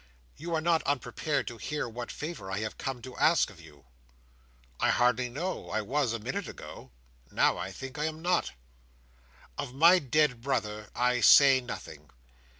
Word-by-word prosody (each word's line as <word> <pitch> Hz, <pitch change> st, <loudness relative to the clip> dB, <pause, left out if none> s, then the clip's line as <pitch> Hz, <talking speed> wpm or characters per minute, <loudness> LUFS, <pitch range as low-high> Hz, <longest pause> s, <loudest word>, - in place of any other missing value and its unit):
You 165 Hz, +2 st, -4 dB
are 160 Hz, -, 0 dB
not 165 Hz, 0 st, +2 dB
unprepared 145 Hz, +2 st, -1 dB
to 120 Hz, -, -6 dB
hear 150 Hz, +5 st, -3 dB
what 120 Hz, +1 st, -6 dB
favour 150 Hz, -, -6 dB
I 95 Hz, -, -2 dB
have 110 Hz, -, -5 dB
come 130 Hz, -3 st, -4 dB
to 130 Hz, -1 st, -9 dB
ask -, -, +3 dB
of -, -, -15 dB
you?" 70 Hz, -1 st, -17 dB, 0.9 s
"I -, -, +2 dB
hardly 125 Hz, 0 st, +2 dB
know. 170 Hz, +10 st, -4 dB
I 110 Hz, -, -1 dB
was, 135 Hz, +2 st, 0 dB
a 115 Hz, -, -2 dB
minute 105 Hz, -, -4 dB
ago. -, -, -10 dB, 0.4 s
Now, -, -, +2 dB
I -, -, -4 dB
think, 135 Hz, +2 st, -8 dB
I 150 Hz, -, 0 dB
am 155 Hz, 0 st, -4 dB
not." 175 Hz, +2 st, 0 dB, 1.1 s
"Of 130 Hz, -2 st, -5 dB
my 170 Hz, +6 st, +7 dB
dead 140 Hz, -3 st, +1 dB
brother 110 Hz, -6 st, -2 dB
I 125 Hz, 0 st, +1 dB
say 135 Hz, 0 st, +7 dB
nothing. 125 Hz, -, -9 dB
130 Hz, 170 wpm, -29 LUFS, 120-150 Hz, 1.1 s, my